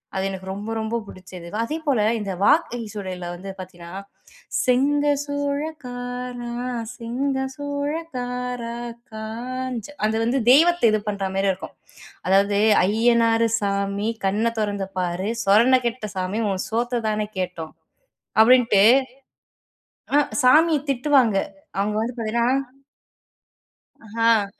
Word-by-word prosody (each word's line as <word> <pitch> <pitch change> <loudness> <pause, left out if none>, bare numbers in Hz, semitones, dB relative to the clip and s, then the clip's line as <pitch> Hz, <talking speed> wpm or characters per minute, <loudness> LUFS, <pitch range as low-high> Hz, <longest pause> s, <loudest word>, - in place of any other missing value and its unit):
அது 190 0 0
எனக்கு 190 -1 -7
ரொம்ப, 205 +3 -6
ரொம்ப 220 +1 -2
பிடிச்சது. 180 -2 -11 0.2
அதேபோல 290 -3 -1 0.2
இந்த 200 -2 -4
வாகை 245 -1 +3
சூடையில 185 -4 -5
வந்து 195 +2 -9
பார்த்தீங்கன்னா, 180 0 -8 0.6
செங்க 280 +4 +2 0.2
சூழகாரா! 250 -4 -4 0.5
செங்க 255 +4 -2 0.2
சூழகார 285 0 -3
காரா! 250 -2 -4 0.4
காஞ்ச 235 +2 -5 0.2
அது 220 - -1
வந்து 245 +4 +1
தெய்வத்தை 340 +2 +5
இது 215 - +2
பண்றாமாரி 195 -1 -1
இருக்கும், 185 - -7 0.5
அதாவது 200 +2 +3 0.2
அய்யனாரு 230 +2 +3
சாமி 200 +1 -1 0.2
கண்ண 205 +4 +1
தொறந்து 200 -2 -1
பாரு, 180 +3 -2 0.2
சொரண 225 +6 +5
கெட்ட 235 -1 -4
சாமி, 185 +3 -2
உன் 185 - -2
சோத்த 240 +1 -1
தானே 210 0 -1
கேட்டோம் 175 -3 -4 0.7
அப்பிடின்ட்டு 230 -4 +6 1.3
அ - - +7 0.2
சாமிய 310 +5 +6
திட்டுவாங்க. 260 -5 +3 0.4
அவுங்க 210 +1 0
வந்து 240 +2 -2
பார்த்தீங்கன்னா 235 +1 0 1.6
ஆ 225 -1 +2
230 Hz, 105 wpm, -23 LUFS, 200-255 Hz, 1.6 s, அ